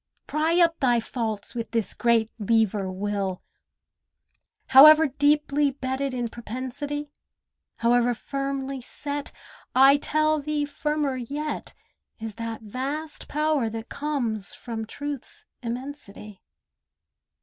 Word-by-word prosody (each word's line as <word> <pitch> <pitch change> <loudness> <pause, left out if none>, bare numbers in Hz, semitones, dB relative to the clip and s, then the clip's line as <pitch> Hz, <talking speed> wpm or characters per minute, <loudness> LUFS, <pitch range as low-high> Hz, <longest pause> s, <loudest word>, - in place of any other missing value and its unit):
Pry 320 +3 +1
up 335 -1 +4
thy 245 -3 +3
faults 220 -3 -4
with 230 -1 -4
this 225 -3 -1
great 230 -2 +2
lever, 210 -3 +1
Will. 195 -1 -2 1.3
However 305 +4 +9
deeply 290 0 +2
bedded 265 0 -3
in 240 -1 -1
propensity, 260 +6 -5 0.6
However 240 +1 +3
firmly 275 0 -3
set, 285 +3 -4 0.4
I 270 +2 +7
tell 310 +1 +1
thee 295 0 -1
firmer 295 -2 -1
yet 285 +5 -4 0.4
Is 220 -1 -5
that 230 -1 -5
vast 275 +8 -4
power 300 -5 +1
that 225 +1 -7
comes 245 -9 -3
from 225 -2 -6
Truth's 290 - -7 0.2
immensity. 235 -5 -7
265 Hz, 105 wpm, -25 LUFS, 230-290 Hz, 1.3 s, However